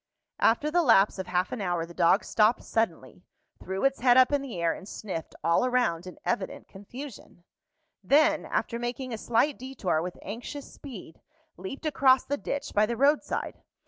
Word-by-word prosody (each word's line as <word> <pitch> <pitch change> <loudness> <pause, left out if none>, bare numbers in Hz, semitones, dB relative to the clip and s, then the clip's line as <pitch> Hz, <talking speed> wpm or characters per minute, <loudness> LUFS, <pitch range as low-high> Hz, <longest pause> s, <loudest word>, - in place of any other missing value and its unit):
After 290 +7 +2
the 350 +2 +3
lapse 215 - +4
of 190 - -4
half 180 +1 0
an 240 - -4
hour 175 -3 -1
the 170 - -13
dog 170 +5 +3
stopped 215 +2 +2
suddenly, 175 - -2 0.4
threw 190 +6 -3
its 275 0 +2
head 245 0 +5
up 255 +1 +6
in 285 -1 +1
the 245 -10 -6
air, 170 -1 +1
and 195 - -10
sniffed 185 -7 -6
all 170 +6 +3
around 245 -9 0
in 180 - -10
evident 205 -5 -3
confusion; 215 -2 -11 0.6
then, 290 +10 +4
after 235 - -2
making 245 +1 -4
a - - -3
slight 240 +6 +1
detour 245 -11 -2
with 180 +1 -6
anxious 245 +8 -7
speed, 225 - -11 0.3
leaped 195 - -8
across 265 -3 +4
the 285 - -2
ditch 285 0 -4
by 210 +1 +3
the 235 0 -3
road 285 +4 +4
side. - - -5
230 Hz, 180 wpm, -27 LUFS, 185-265 Hz, 0.6 s, up